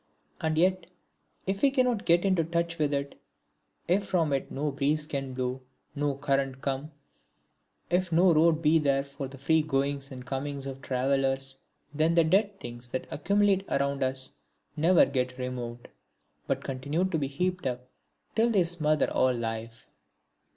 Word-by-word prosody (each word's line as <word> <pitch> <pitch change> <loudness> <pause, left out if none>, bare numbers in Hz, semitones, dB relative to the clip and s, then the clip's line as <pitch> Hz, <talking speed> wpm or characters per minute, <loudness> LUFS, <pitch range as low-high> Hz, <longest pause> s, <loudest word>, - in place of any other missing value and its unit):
And 160 -1 0
yet 185 +1 +2 0.6
if 195 +1 -2
we 280 - +6
cannot 250 -5 +1
get 170 +2 +4
into 185 -4 +3
touch 170 +1 -2
with 150 -2 +1
it, 140 0 -3 0.7
if 190 +4 +2
from 170 -6 +1
it 135 - -1
no 145 +2 -2
breeze 150 +2 +1
can 135 -3 -4
blow, 130 0 -2 0.3
no 145 -1 -1
current 135 -2 -1
come, 135 +2 -2 1.0
if 180 0 +1
no 175 +2 +5
road 160 +1 +3
be 160 +2 +5
there 140 -2 +2
for 140 0 -7
the 135 +1 -11
free 160 +4 +3
goings 140 -2 -1
and 125 -1 -8
comings 135 +1 -4
of 135 -1 -6
travellers, 135 0 0 0.3
then 160 +3 +2
the 170 - +6
dead 195 +4 +2
things 120 -6 -8
that 130 - -3
accumulate 200 +3 +2
around 140 0 0
us 130 0 -1 0.4
never 165 +3 +5
get 125 -1 -2
removed, 125 -2 -5 0.6
but - - -1
continue 140 +7 -1
to 175 -4 -1
be 140 - -1
heaped 180 +3 -2
up 125 0 -4 0.5
till 230 +1 +3
they 200 -6 +4
smother 155 -3 +1
all 130 -1 +2
life. 115 0 -5
145 Hz, 160 wpm, -28 LUFS, 135-170 Hz, 1.0 s, we